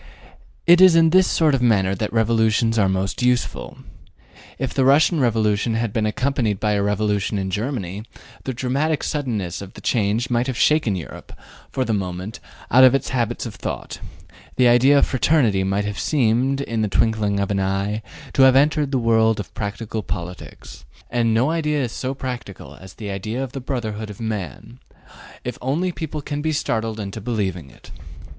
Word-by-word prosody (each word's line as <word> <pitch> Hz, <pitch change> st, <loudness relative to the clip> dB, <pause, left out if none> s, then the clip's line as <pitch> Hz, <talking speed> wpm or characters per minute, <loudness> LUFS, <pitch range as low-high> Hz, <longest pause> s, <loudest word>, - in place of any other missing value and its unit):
It 175 Hz, +1 st, +6 dB
is 185 Hz, -3 st, +8 dB
in 165 Hz, -1 st, +5 dB
this 185 Hz, +1 st, +5 dB
sort 155 Hz, -3 st, +2 dB
of 135 Hz, -, +1 dB
matter 100 Hz, -6 st, +2 dB
that 105 Hz, +2 st, -3 dB
revolutions 115 Hz, 0 st, +2 dB
are 100 Hz, -2 st, +3 dB
most 95 Hz, +3 st, -2 dB
useful. 125 Hz, 0 st, -1 dB, 0.8 s
If 135 Hz, -2 st, -3 dB
the 135 Hz, -, +1 dB
Russian 150 Hz, +5 st, +4 dB
Revolution 110 Hz, -3 st, +1 dB
had 115 Hz, -2 st, -2 dB
been 110 Hz, -2 st, 0 dB
accompanied 125 Hz, -4 st, -1 dB
by 105 Hz, -, 0 dB
a 100 Hz, -1 st, +1 dB
revolution 105 Hz, 0 st, 0 dB
in 95 Hz, -1 st, -3 dB
Germany, 105 Hz, -2 st, -3 dB, 0.4 s
the 130 Hz, -, -2 dB
dramatic 135 Hz, +5 st, -1 dB
suddenness 110 Hz, -, -3 dB
of 100 Hz, -1 st, -10 dB
the -, -, -10 dB
change 115 Hz, +2 st, 0 dB
might 120 Hz, +1 st, +1 dB
have 130 Hz, -3 st, -3 dB
shaken 150 Hz, -10 st, +2 dB
Europe, 85 Hz, -7 st, -9 dB, 0.4 s
for 130 Hz, -, -1 dB
the 115 Hz, -, -1 dB
moment, 95 Hz, +3 st, -4 dB, 0.3 s
out 130 Hz, +2 st, +7 dB
of 130 Hz, 0 st, +7 dB
its 135 Hz, -, -2 dB
habits 120 Hz, -2 st, -2 dB
of 115 Hz, -, -6 dB
thought: -, -, -6 dB, 0.6 s
the 125 Hz, -1 st, +4 dB
idea 125 Hz, +4 st, +5 dB
of -, -, +4 dB
fraternity 125 Hz, -8 st, +2 dB
might 100 Hz, +2 st, -1 dB
have 105 Hz, -1 st, -4 dB
seemed, 135 Hz, 0 st, +1 dB
in 115 Hz, -4 st, -2 dB
the 105 Hz, -, +1 dB
twinkling 105 Hz, -1 st, +1 dB
of 100 Hz, 0 st, -1 dB
an 100 Hz, -, 0 dB
eye, 95 Hz, +3 st, -1 dB, 0.3 s
to -, -, +2 dB
have 130 Hz, -1 st, +7 dB
entered 150 Hz, +1 st, +3 dB
the 135 Hz, -, +1 dB
world 115 Hz, -2 st, +2 dB
of 105 Hz, -, -7 dB
practical 110 Hz, +1 st, -4 dB
politics; 90 Hz, -2 st, -8 dB, 0.3 s
and 115 Hz, -1 st, +1 dB
no 120 Hz, +7 st, +2 dB
idea 150 Hz, -3 st, 0 dB
is 120 Hz, -, -3 dB
so 130 Hz, +2 st, -4 dB
practical 120 Hz, -, -7 dB
as 95 Hz, +4 st, -13 dB
the 105 Hz, -3 st, -6 dB
idea 110 Hz, +7 st, -3 dB
of 130 Hz, -, -6 dB
the 135 Hz, -1 st, -6 dB
brotherhood 110 Hz, -5 st, -4 dB
of 105 Hz, -, -10 dB
man, 110 Hz, -, -5 dB, 0.6 s
if 125 Hz, -, -5 dB
only 155 Hz, +8 st, -1 dB
people 155 Hz, -3 st, -6 dB
can 145 Hz, +1 st, -4 dB
be 155 Hz, +1 st, -1 dB
startled 115 Hz, -6 st, -2 dB
into 100 Hz, +1 st, -6 dB
believing 95 Hz, -, -3 dB
in -, -, -18 dB
it. -, -, -16 dB
115 Hz, 185 wpm, -21 LUFS, 105-130 Hz, 0.8 s, is